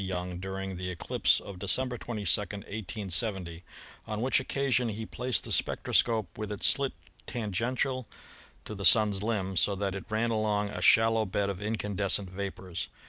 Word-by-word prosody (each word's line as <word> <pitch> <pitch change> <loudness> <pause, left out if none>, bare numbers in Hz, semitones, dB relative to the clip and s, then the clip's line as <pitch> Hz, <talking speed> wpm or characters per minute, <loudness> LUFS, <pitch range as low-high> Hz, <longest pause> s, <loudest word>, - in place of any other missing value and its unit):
Young 90 -1 -3
during 95 0 -4
the 90 0 -4
eclipse 90 -2 +2
of 100 -3 -9
December 125 +6 +1
22, 110 -3 -4
1870, 100 -3 -3 0.4
on 105 0 -3
which 130 +4 +3
occasion 130 -2 +1
he 110 +1 -4
placed 125 +3 0
the - - -7
spec - - 0
troscope 115 -3 +2
with 105 -1 -5
its 105 - -2
slit 140 -1 +3 0.3
tangential 120 +4 -1 0.6
to - - -6
the 100 -1 -6
Sun's 100 +2 +5
limb, 100 -4 -1
so 100 +4 +3
that 100 0 -2
it 95 - -6
ran 110 +2 0
along 105 -2 +1
a - - -5
shallow 115 -1 +5
bed 100 +1 0
of 95 0 -7
incandescent 105 -3 0
vapors. 95 -2 -5
105 Hz, 160 wpm, -29 LUFS, 95-115 Hz, 0.6 s, Sun's